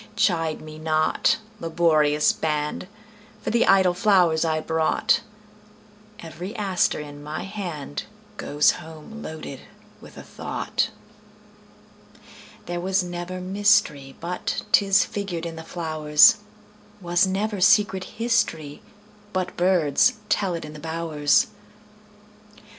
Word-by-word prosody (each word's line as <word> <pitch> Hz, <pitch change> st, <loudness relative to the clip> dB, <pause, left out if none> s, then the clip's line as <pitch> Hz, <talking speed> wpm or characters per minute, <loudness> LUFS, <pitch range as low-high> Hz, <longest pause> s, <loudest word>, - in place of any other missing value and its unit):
Chide 165 Hz, -4 st, +1 dB
me 155 Hz, 0 st, -10 dB
not, 155 Hz, 0 st, +1 dB, 0.2 s
laborious 155 Hz, -3 st, +2 dB
band, 150 Hz, +2 st, -2 dB, 0.6 s
For -, -, -2 dB
the 235 Hz, +1 st, +2 dB
idle 190 Hz, -2 st, +5 dB
flowers 180 Hz, -5 st, +3 dB
I 160 Hz, -1 st, 0 dB
brought; 160 Hz, 0 st, +1 dB, 1.0 s
Every 180 Hz, +5 st, -8 dB
aster 195 Hz, -5 st, 0 dB
in 145 Hz, -1 st, -9 dB
my 150 Hz, +4 st, -5 dB
handGoes 150 Hz, -, -2 dB
home 160 Hz, +7 st, -11 dB
loaded 155 Hz, -6 st, -7 dB, 0.4 s
with -, -, -14 dB
a -, -, -9 dB
thought. -, -, -3 dB, 1.8 s
There 175 Hz, 0 st, -4 dB
was 190 Hz, +1 st, +1 dB
never 175 Hz, +1 st, -6 dB
mysteryBut 180 Hz, -5 st, 0 dB
'tis 195 Hz, 0 st, +4 dB
figured 185 Hz, -5 st, -5 dB
in 165 Hz, -1 st, -5 dB
the 160 Hz, -, -7 dB
flowers; 155 Hz, 0 st, +4 dB, 0.6 s
SWas 175 Hz, 0 st, +2 dB
never 200 Hz, +1 st, -2 dB
secret 190 Hz, 0 st, +3 dB
historyBut 210 Hz, -1 st, -3 dB
birds 175 Hz, -6 st, +3 dB, 0.2 s
tell 190 Hz, -4 st, +1 dB
it 165 Hz, -, -6 dB
in 150 Hz, -, -10 dB
the 155 Hz, -, -10 dB
bowers. 160 Hz, -2 st, +1 dB
170 Hz, 105 wpm, -24 LUFS, 155-195 Hz, 1.8 s, idle